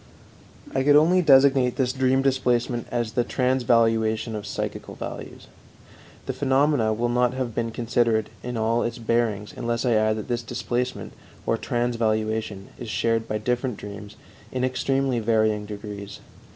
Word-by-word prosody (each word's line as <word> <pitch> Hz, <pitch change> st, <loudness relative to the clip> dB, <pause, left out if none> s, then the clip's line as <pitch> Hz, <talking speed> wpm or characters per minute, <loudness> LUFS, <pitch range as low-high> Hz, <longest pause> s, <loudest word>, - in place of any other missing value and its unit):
I 135 Hz, -, +1 dB
could 145 Hz, +2 st, +5 dB
only 170 Hz, +5 st, +5 dB
designate 135 Hz, -4 st, +5 dB
this 125 Hz, -2 st, 0 dB
dream 130 Hz, 0 st, +2 dB
displacement 125 Hz, -3 st, +1 dB
as 120 Hz, -2 st, -2 dB
the 120 Hz, +2 st, +1 dB
transvaluation 115 Hz, -3 st, +1 dB
of 105 Hz, -1 st, -5 dB
psychical -, -, -5 dB
values. -, -, -8 dB, 0.8 s
The -, -, -2 dB
phenomena 135 Hz, -4 st, +2 dB
will 115 Hz, +3 st, 0 dB
not 125 Hz, +1 st, +1 dB
have 130 Hz, -3 st, -3 dB
been 115 Hz, +1 st, -1 dB
considered 115 Hz, -1 st, 0 dB
in 125 Hz, -1 st, -4 dB
all 115 Hz, +2 st, +1 dB
its 115 Hz, 0 st, -2 dB
bearings 115 Hz, -3 st, -1 dB
unless 120 Hz, +1 st, -2 dB
I 125 Hz, -, +2 dB
add 110 Hz, 0 st, +3 dB
that 110 Hz, -, -6 dB
this 120 Hz, -1 st, -1 dB
displacement 125 Hz, +2 st, -3 dB, 0.3 s
or -, -, +2 dB
transvaluation 110 Hz, -4 st, -1 dB
is 120 Hz, -, -6 dB
shared 115 Hz, +1 st, 0 dB
by 110 Hz, -, -1 dB
different 125 Hz, +1 st, -1 dB
dreams 105 Hz, 0 st, -9 dB, 0.4 s
in 130 Hz, -1 st, -2 dB
extremely 130 Hz, 0 st, 0 dB
varying 110 Hz, -2 st, +1 dB
degrees. 105 Hz, -1 st, -7 dB
120 Hz, 150 wpm, -24 LUFS, 110-125 Hz, 0.8 s, could